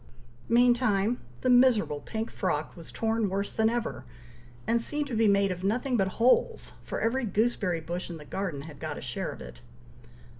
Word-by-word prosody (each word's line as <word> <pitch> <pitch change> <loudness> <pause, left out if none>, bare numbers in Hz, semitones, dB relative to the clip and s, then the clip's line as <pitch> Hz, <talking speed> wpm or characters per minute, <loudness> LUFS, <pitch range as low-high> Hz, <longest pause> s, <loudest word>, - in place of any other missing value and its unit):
Meantime, 240 -2 +3 0.2
the 255 - +1
miserable 245 - +4
pink 220 +8 -4
frock 155 -5 -2
was 165 -2 -10
torn 225 -2 0
worse 200 +1 -2
than 220 0 +2
ever, 240 0 -3 0.6
and 230 0 +2
seemed 295 +5 -1
to 275 - -7
be 220 0 +3
made 200 -1 +3
of 180 0 -5
nothing 245 +6 0
but 195 -4 +2
holes, 450 - +2
for - - -5
every 250 +4 0
gooseberry 205 -5 0
bush 175 +4 -5
in 170 - -6
the 150 - -11
garden 180 -7 -4
had 150 -2 -11
got - - -4
a - - -7
share - - -3
of - - -10
it. - - -11
220 Hz, 185 wpm, -28 LUFS, 185-240 Hz, 0.6 s, miserable